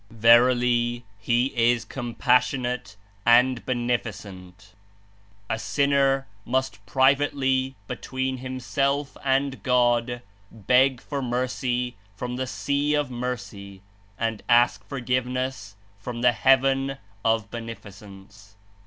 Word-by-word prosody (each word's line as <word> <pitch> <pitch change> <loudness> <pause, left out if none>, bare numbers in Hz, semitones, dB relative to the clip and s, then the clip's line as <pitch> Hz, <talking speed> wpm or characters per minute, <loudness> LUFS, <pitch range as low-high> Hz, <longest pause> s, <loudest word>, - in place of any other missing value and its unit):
Verily, 120 +1 +3
He 120 +5 +1
is 120 0 +2
Compassionate 125 -1 0 0.3
and 120 +2 +4
Beneficent! 105 -6 -4 0.7
A 110 - -2
sinner 140 0 +1 0.2
must 130 +3 -1
08 100 - -32
(privately) 135 +2 +2
between 130 +4 -3
himself 135 +2 -2
and 135 -3 0
God 120 0 +1 0.3
beg 125 +4 +2
for 140 -2 -4
mercy 125 -1 -2 0.2
from 125 +3 -5
the 130 +1 -3
Sea 145 +3 0
of 145 -3 -1
Mercy 100 -6 -6 0.3
and 115 -2 -2
ask 120 -5 +4
forgiveness 125 -4 -3 0.2
from 120 +3 -6
the 125 0 +5
Heaven 135 +2 +2 0.3
of 110 -2 0
Beneficence." 100 -3 -11
125 Hz, 100 wpm, -25 LUFS, 115-130 Hz, 0.7 s, the